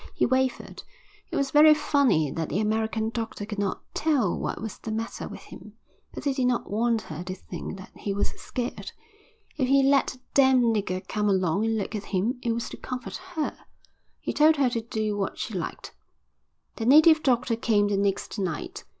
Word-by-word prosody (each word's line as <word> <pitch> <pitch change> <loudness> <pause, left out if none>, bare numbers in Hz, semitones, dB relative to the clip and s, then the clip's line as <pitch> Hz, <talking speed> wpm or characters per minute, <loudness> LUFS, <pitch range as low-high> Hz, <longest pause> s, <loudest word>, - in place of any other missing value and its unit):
He - - +2
wavered. 260 0 -1 0.5
It - - -5
was 275 -1 0
very 305 +1 +8
funny 280 - +2
that 160 +2 -3
the 195 - -1
American 220 +1 0
doctor 225 -3 -4
could 210 -1 -5
not 200 -2 -2
tell 275 - +1
what - - -3
was 220 -2 -6
the 220 - -6
matter 225 +1 -4
with - - -9
him. - - -12 0.4
But - - -8
he 280 - +1
did 260 -2 +1
not 245 -4 -1
want 230 +1 +1
her 155 +2 -7
to 185 +1 -5
think 190 - -7
that 190 +3 -11
he 205 - -4
was 200 +1 0
scared. 245 -1 -5 0.6
If 260 -4 +1
he 275 +1 +4
let 275 0 +3
a - - -20
damned 255 -4 +5
nigger 185 -3 -2
come 210 -1 0
along 190 +1 +1
and 225 0 +1
look 205 - -3
at 210 -2 -4
him, 220 +7 -1
it 235 - 0
was 230 0 -2
to - - -8
comfort 250 -1 -6 0.2
her. 310 -2 -1 0.6
He - - -3
told 310 +1 +5
her 270 -4 +2
to 230 - -1
do 220 -2 -2
what 195 -1 -2
she - - -4
liked. - - -5 0.8
The 225 - -2
native 310 +3 +7
doctor 245 -4 +2
came 215 -3 +2
the 205 - 0
next 200 +2 -1
night. 180 -5 -4
225 Hz, 200 wpm, -26 LUFS, 205-260 Hz, 0.8 s, very